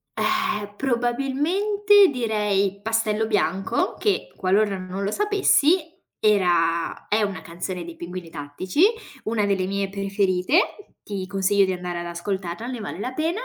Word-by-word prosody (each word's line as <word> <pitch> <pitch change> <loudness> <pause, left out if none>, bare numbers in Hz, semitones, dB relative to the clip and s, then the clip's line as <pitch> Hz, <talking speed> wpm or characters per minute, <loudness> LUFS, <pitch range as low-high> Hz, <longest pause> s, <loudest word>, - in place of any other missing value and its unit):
Ehm, 360 - 0
probabilmente 295 - +3
direi 210 -5 0
pastello 220 0 0
bianco 195 -3 0
che 410 -2 0
qualora 195 +2 +1
non 185 +1 -5
lo 200 - -1
sapessi 375 - +2 0.2
era 175 -5 +2
è 215 +1 +2
una 200 -2 -2
canzone 175 +1 -5
dei 170 -1 -9
pinguini 175 0 -7
tattici, 160 - -3 0.4
una 215 -1 +1
delle 195 -2 0
mie 200 0 -1
preferite. 195 - 0
Ti 195 -2 -4
consiglio 200 +1 +2
di 190 - +1
andare 180 -1 -4
ad 175 - -5
ascoltarla 180 +4 -4
ne 250 -1 -5
vale 205 - -6
la 255 +5 -4
pena. 325 - -1
205 Hz, 140 wpm, -23 LUFS, 185-260 Hz, 0.4 s, probabilmente